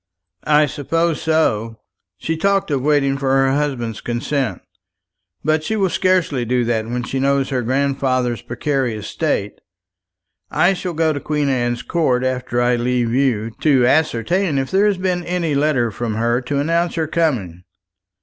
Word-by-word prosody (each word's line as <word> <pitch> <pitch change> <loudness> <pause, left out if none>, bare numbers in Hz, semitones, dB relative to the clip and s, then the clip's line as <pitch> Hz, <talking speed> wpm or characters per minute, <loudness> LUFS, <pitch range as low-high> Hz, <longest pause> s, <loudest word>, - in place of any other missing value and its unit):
"I 150 0 +5
suppose 165 +3 -1
so. 115 -9 0 0.4
She 165 - -2
talked 195 +1 +1
of 140 -2 0
waiting 140 -1 +2
for 135 -1 0
her 135 0 +3
husband's 130 -6 -2
consent; 125 +2 -2 0.8
but 155 +1 +1
she 220 - -2
will 195 -4 +1
scarcely 180 -9 +1
do 125 +1 0
that 115 -2 -1
when 120 0 -2
she 135 +2 -3
knows 140 0 +1
her 130 -3 -1
grandfather's 130 -2 0
precarious 120 -3 -2
state. 105 -7 -2 0.9
I 185 +2 +3
shall 180 -1 -4
go 160 -1 +2
to 145 - -3
Queen 150 -1 -1
Anne's 120 -2 -1
Court 130 -8 0
after 125 -1 -1
I 120 0 +2
leave 120 -1 0
you, 120 -4 +1
to 135 -5 +4
ascertain 155 - +1
if 135 -1 -2
there 195 +2 +3
has 205 -2 +1
been 180 -1 -1
any 170 -3 -1
letter 140 -5 +1
from 110 +1 -3
her 120 +2 +1
to 140 +2 -3
announce 165 +4 0
her 160 -2 0
coming. 120 - -1
135 Hz, 160 wpm, -19 LUFS, 120-160 Hz, 0.9 s, I